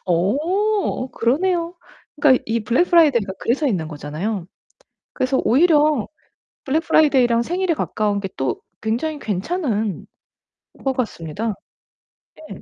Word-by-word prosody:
어 295 Hz, -, 0 dB
그러네요. 335 Hz, +8 st, 0 dB, 0.5 s
그러니까 265 Hz, -3 st, +5 dB
이 230 Hz, +1 st, 0 dB
블랙프라이데이가 255 Hz, -, +3 dB
그래서 280 Hz, +6 st, 0 dB
있는 180 Hz, -, -1 dB
거잖아요. 165 Hz, +6 st, -4 dB, 0.7 s
그래서 260 Hz, +1 st, 0 dB
오히려 300 Hz, -2 st, +3 dB, 0.6 s
블랙프라이데이랑 270 Hz, -5 st, +3 dB
생일에 350 Hz, +5 st, 0 dB
가까운게 205 Hz, -7 st, -1 dB
또 130 Hz, -2 st, -2 dB, 0.2 s
굉장히 245 Hz, +8 st, -2 dB
괜찮은 215 Hz, -, -2 dB, 0.8 s
것 270 Hz, -, +1 dB
같습니다. 215 Hz, -, -3 dB, 1.0 s
네. -, -, -9 dB
250 Hz, 290 characters per minute, -21 LUFS, 210-315 Hz, 1.0 s, 그러니까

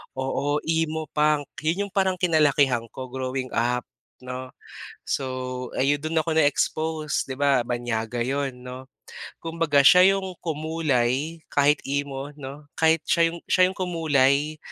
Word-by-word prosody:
Oo, 140 Hz, +2 st, -1 dB
Emo 160 Hz, -1 st, 0 dB
punk, 150 Hz, -1 st, +2 dB, 0.2 s
'yon 160 Hz, +5 st, -1 dB
'yong -, -, -18 dB
parang 190 Hz, -1 st, +2 dB
kinalakihan 145 Hz, -, +2 dB
ko, 130 Hz, +2 st, -9 dB
growing 130 Hz, 0 st, -3 dB
up 120 Hz, +1 st, 0 dB, 0.4 s
'no. 125 Hz, 0 st, -6 dB, 0.6 s
So 130 Hz, -2 st, -3 dB
ayon, 140 Hz, +2 st, +2 dB
do'n 160 Hz, +1 st, 0 dB
ako 165 Hz, -, -2 dB
na-expose, 155 Hz, +1 st, +1 dB
'di 130 Hz, -, -5 dB
ba 140 Hz, -3 st, +3 dB
banyaga 120 Hz, -1 st, -3 dB
'yon 135 Hz, -2 st, -2 dB
'no. 130 Hz, +1 st, -8 dB, 0.6 s
Kumbaga 165 Hz, -3 st, +1 dB
siya 185 Hz, +4 st, +7 dB
yung 190 Hz, -1 st, -5 dB
kumulay 155 Hz, -2 st, -1 dB
kahit 145 Hz, +1 st, +4 dB
emo 140 Hz, 0 st, -3 dB
'no, 145 Hz, +1 st, -9 dB
kahit 160 Hz, -1 st, +3 dB
siya 165 Hz, 0 st, +3 dB
yung 170 Hz, -, -8 dB
siya 185 Hz, 0 st, +4 dB
yung 190 Hz, -, -9 dB
kumulay 155 Hz, -4 st, +1 dB
145 Hz, 140 wpm, -24 LUFS, 130-160 Hz, 0.6 s, siya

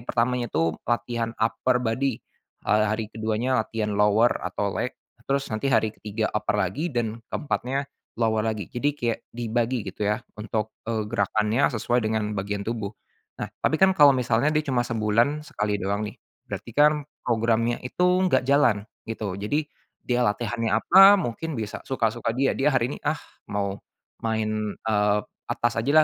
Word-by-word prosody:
pertamanya 120 Hz, 0 st, 0 dB
itu 80 Hz, 0 st, +1 dB, 0.2 s
latihan 115 Hz, -1 st, -1 dB
upper 115 Hz, +3 st, +1 dB
body, 125 Hz, +1 st, 0 dB, 0.5 s
eee, 105 Hz, 0 st, +3 dB
hari 110 Hz, 0 st, -2 dB
ke-2nya 110 Hz, +3 st, 0 dB
latihan 110 Hz, -1 st, -2 dB
lower 105 Hz, +3 st, +4 dB, 0.2 s
atau -, -, -2 dB
leg, -, -, -3 dB, 0.3 s
terus 140 Hz, 0 st, -1 dB
nanti 135 Hz, +5 st, -1 dB
hari 110 Hz, -3 st, +2 dB
ke-3 110 Hz, +1 st, -2 dB
upper 105 Hz, 0 st, 0 dB
lagi 135 Hz, -, -1 dB
dan 115 Hz, -2 st, -2 dB
ke-4nya 140 Hz, -1 st, -2 dB, 0.3 s
lower 110 Hz, -2 st, +2 dB
lagi. 110 Hz, -4 st, -2 dB
Jadi 130 Hz, +4 st, 0 dB
kayak 120 Hz, -5 st, -2 dB
dibagi 120 Hz, -1 st, -1 dB
gitu 95 Hz, -, -5 dB
ya, 105 Hz, +2 st, +1 dB, 0.2 s
untuk, 110 Hz, 0 st, -3 dB
eee, 110 Hz, -2 st, -2 dB
gerakannya 105 Hz, +4 st, +1 dB
sesuai 120 Hz, +1 st, 0 dB
dengan 110 Hz, -1 st, -1 dB
bagian 100 Hz, +1 st, -2 dB
tubuh. 110 Hz, -3 st, -2 dB, 0.5 s
Nah, -, -, -3 dB, 0.2 s
tapi 155 Hz, -, +2 dB
kan 190 Hz, 0 st, +6 dB
kalau 145 Hz, -1 st, +8 dB
misalnya 125 Hz, +2 st, +2 dB
dia 155 Hz, -, +3 dB
cuma 125 Hz, -3 st, +1 dB
sebulan 115 Hz, +5 st, +1 dB
sekali 105 Hz, 0 st, -1 dB
doang 100 Hz, +3 st, -1 dB
nih, 105 Hz, -, -7 dB, 0.3 s
berarti -, -, -5 dB
kan 150 Hz, 0 st, +4 dB, 0.2 s
programnya 115 Hz, 0 st, +1 dB
itu 180 Hz, -, -3 dB, 0.2 s
enggak 180 Hz, -9 st, +3 dB
jalan, 130 Hz, -7 st, +3 dB, 0.2 s
gitu. 105 Hz, -4 st, -4 dB
Jadi, 145 Hz, +10 st, 0 dB, 0.4 s
dia 125 Hz, 0 st, +1 dB
latihannya 115 Hz, +2 st, -1 dB
apa, 195 Hz, -, +8 dB
mungkin 160 Hz, -, -3 dB
bisa 110 Hz, -2 st, -4 dB
suka-suka 115 Hz, -2 st, -1 dB
dia. 135 Hz, +1 st, +3 dB
Dia 140 Hz, +2 st, +1 dB
hari 125 Hz, +1 st, +2 dB
ini, -, -, -6 dB
ah, 150 Hz, +1 st, +1 dB, 0.3 s
mau 100 Hz, -1 st, -2 dB, 0.4 s
main, 110 Hz, -2 st, -1 dB
eee, 105 Hz, -1 st, +1 dB, 0.3 s
atas 120 Hz, 0 st, 0 dB
aja 130 Hz, +5 st, -1 dB
115 Hz, 160 wpm, -25 LUFS, 105-125 Hz, 0.5 s, kalau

